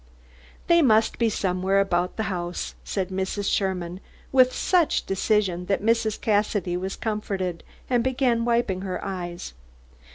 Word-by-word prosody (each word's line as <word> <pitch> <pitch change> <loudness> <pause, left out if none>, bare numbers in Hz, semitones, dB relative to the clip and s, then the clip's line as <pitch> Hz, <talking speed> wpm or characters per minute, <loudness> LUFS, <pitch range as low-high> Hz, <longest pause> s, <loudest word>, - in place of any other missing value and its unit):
"They 340 0 +5
must 220 -6 +3
be 230 -1 +3
somewhere 190 -1 +1
about 180 -2 0
the 220 - 0
house," 175 -4 -3
said 190 -2 -2
Mrs. 190 +1 -2
Sherman, 185 -2 -2 0.3
with 255 -1 +5
such 350 +1 +1
decision 195 -2 0
that 200 0 0
Mrs. 225 -1 +1
Cassidy 205 -4 0
was 190 +2 -3
comforted, 195 -6 -3 0.2
and 245 -2 +2
began 250 -2 +1
wiping 235 -6 +1
her 190 -1 -3
eyes. 175 - -5
195 Hz, 135 wpm, -25 LUFS, 185-230 Hz, 0.3 s, They